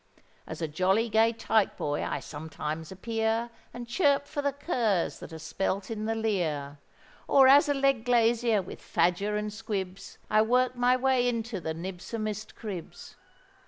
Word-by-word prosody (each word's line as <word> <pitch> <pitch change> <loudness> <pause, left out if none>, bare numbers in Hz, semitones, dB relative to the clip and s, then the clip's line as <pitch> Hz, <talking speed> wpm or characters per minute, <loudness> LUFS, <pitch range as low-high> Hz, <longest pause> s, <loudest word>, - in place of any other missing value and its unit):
As 160 +1 -6
a - - 0
jolly 190 +9 +1
gay 225 +1 +4
tyke 220 -2 +1
boy 145 0 -2
I - - -2
sometimes 155 +1 -6
appear, 225 +3 -1 0.2
And 240 0 -8
chirp 285 +1 +2
for 290 0 -4
the 285 0 +1
curs 235 - -1
that - - -10
are 160 - -7
spelt 190 +5 -3
in 215 -1 -3
the 225 0 -1
leer; 160 -10 -2 0.5
Or 270 -1 +6
as 285 +3 +7
a 285 - +2
leg 275 -4 +2
glazier, 235 -3 +3
with 180 - -10
fadger 200 +4 +1
and 210 0 -3
squibs, 200 -4 -5
I 215 0 +4
work 250 +3 +2
my 245 +1 +3
way 255 -1 +2
into 230 -3 -3
the 160 -1 -3
nibsomest 210 +5 -5
cribs. 195 -7 -8
220 Hz, 160 wpm, -28 LUFS, 185-240 Hz, 0.5 s, as